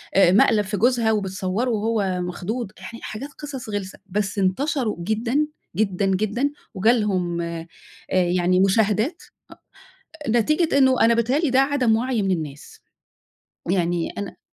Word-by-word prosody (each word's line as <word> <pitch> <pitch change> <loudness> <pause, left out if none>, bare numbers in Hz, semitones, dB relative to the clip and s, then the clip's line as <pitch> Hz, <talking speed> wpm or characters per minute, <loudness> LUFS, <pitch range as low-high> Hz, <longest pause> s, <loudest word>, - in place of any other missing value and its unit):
آآ، 185 -2 +6
مقلَب 210 +1 +4
في 205 +1 -3
جوزها 235 0 +3
وبتصوّره 195 +2 -1
وهو 210 -5 0
مخضوض، 195 +5 -4
يعني 230 - -9
حاجات 220 +7 -6
قِصَص 275 -6 -7
غِلسة 200 -2 -5
بس 205 +1 -2
انتشروا 235 +5 0
جدًا، 230 - 0 0.3
جدًا، 195 -1 0
جدًا، 215 +8 0 0.2
وجَه 195 +5 +3
لهم 185 -7 0
آآ 170 -1 -5 0.4
يعني 180 0 +2
مشاهدات 215 - +2 1.0
أ - - 0
نتيجة 305 +7 +2
إنه 260 -2 +4
أنا 230 +1 +5
بيتهيّأ 235 +4 +1
لي 320 - +1
ده 260 +1 +4
عدَم 270 -5 +2
وعي 245 -2 0
من 195 - 0
الناس 150 -5 -5 0.9
يعني، 175 -2 0
أنا 200 -1 -5
210 Hz, 140 wpm, -23 LUFS, 185-245 Hz, 1.0 s, آآ